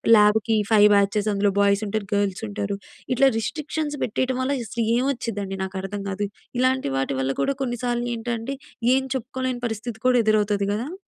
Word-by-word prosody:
ల్యాబ్‌కి 215 +1 +4
5 210 -1 +7
బ్యాచెస్ 200 +1 +2
అందులో 200 0 +2
బాయ్స్ 200 +1 +3
ఉంటారు. 215 -1 -2
గర్ల్స్ 200 -2 0
ఉంటారు. 200 -1 -3 0.4
ఇట్లా 270 +2 +5
రిస్ట్రిక్షన్స్ 300 +3 -3
పెట్టేయటం 255 +3 -1
వల్ల 260 +2 0
అసలు 230 +2 -2
ఏం 245 - +2
వచ్చిందండి 205 -6 -4
నాకర్థం 190 +1 -4
కాదు. 200 +2 -2 0.3
ఇలాంటి 260 - +2
వాటి 135 +1 0
వల్ల 135 0 0
కూడా 275 - +1
కొన్నిసార్లు 240 -1 -1
ఏంటంటే, 230 +2 -3 0.4
ఏం 265 - +1
చెప్పుకోలేని 255 0 -3
పరిస్థితి 220 +1 -5
కూడా 250 -1 +5
ఎదురవుతది 210 -2 +2
కదా! 245 - -3
220 Hz, 155 wpm, -24 LUFS, 200-255 Hz, 0.4 s, 5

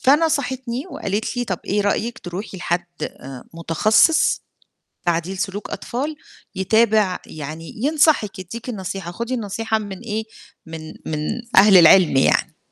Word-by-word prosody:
فنصحتني 265 -3 +1
وقالت 210 +5 -3
لي: 245 - 0
"طَب 185 -7 -3
إيه 205 +2 0
رأيِك 215 +3 -1
تروحي 190 +3 -7
لحد 175 0 -1 0.2
آآ، 130 -1 -7
متخصص، 215 - +3 0.6
تعديل 175 +3 -1
سلوك 195 +2 -4
أطفال 290 +6 -4 0.4
يتابع 210 0 +2
يعني 155 +2 -8
ينصحِك، 290 -9 +3
يدّيكِ 210 +7 -8
النصيحة، 190 -5 -5
خُدي 235 +6 -3
النصيحة 220 0 -1
من 200 -3 -7
إيه 220 -1 -3 0.4
من 160 -1 -8
من 155 - -2 0.4
أهل 195 0 +8
العِلم 170 -2 +7
يعني." 135 - +2
205 Hz, 125 wpm, -21 LUFS, 175-235 Hz, 0.6 s, أهل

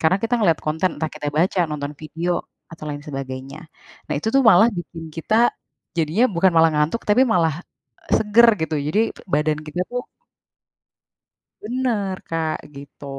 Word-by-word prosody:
Karena 165 +4 +3
kita 235 +2 +1
ngelihat 170 -8 +3
konten, 160 +4 +1
entah 160 -1 -2
kita 145 -1 -3
baca, 175 +5 +1
nonton 145 0 -4
video, 165 +4 -3 0.3
atau 160 -2 -10
lain 145 0 -6
sebagainya. 135 0 -6 0.5
Nah, - - +1
itu 220 - -2
tuh 275 - +5
malah 220 -1 +7
bikin 165 -1 -8
kita, 165 +6 -2 0.6
jadinya 165 +8 +2
bukan 185 +2 +4
malah 165 0 +6
ngantuk, 150 +10 0
tapi 210 +5 +4
malah 170 - +2 0.6
seger 220 +2 +5
gitu, 160 0 -1
jadi 195 +8 +1 0.3
badan 150 -1 +1
kita 155 +4 -5
tuh 245 0 -2 1.6
Bener 220 -5 -1
Kak, 160 -1 -1 0.2
gitu. 140 +1 -12
165 Hz, 150 wpm, -21 LUFS, 150-205 Hz, 1.6 s, malah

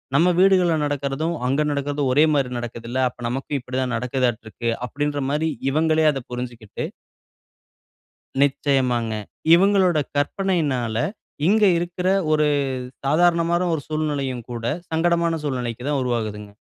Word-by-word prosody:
"நம்ம 175 +5 +5
வீடுகள்ல 185 -4 +4
நடக்கிறதும், 145 +3 -2
அங்கு 140 +4 +2
நடக்கறதும் 140 -1 -1
ஒரே 150 +4 +5
மாரி 135 -3 +1
நடக்குதுல. 120 +1 -5
அப்ப 120 - -13
நமக்கும் 135 +3 -3
இப்பிடி 125 +1 -4
தான் 125 -2 -1
நடக்குதாட்டுருக்கு". 120 -2 -2 0.2
அப்பிடின்றமாரி 145 +3 -1 0.2
இவங்களே 155 +1 +2
அத 135 -2 -4
புரிஞ்சிக்கிட்டு 120 -3 -5 1.6
நிச்சயமாங்க. 130 -5 +1 0.4
இவுங்களோட 185 -3 +4 0.2
கற்பனையினால, 145 - 0 0.5
இங்க 215 +3 +4
இருக்குற 175 +1 -2 0.2
ஒரு 150 -1 +3 0.6
சாதாரணமான 170 +3 +3
ஒரு 150 - -1
சூழ்நிலையும் 140 -6 -2
கூட 115 -1 -5 0.3
சங்கடமான 170 +1 +2
சூழ்நிலைக்கு 125 -4 -3
தான் 145 -2 +1
உருவாகுதுங்க. 110 -4 -3
140 Hz, 110 wpm, -22 LUFS, 125-160 Hz, 1.6 s, நம்ம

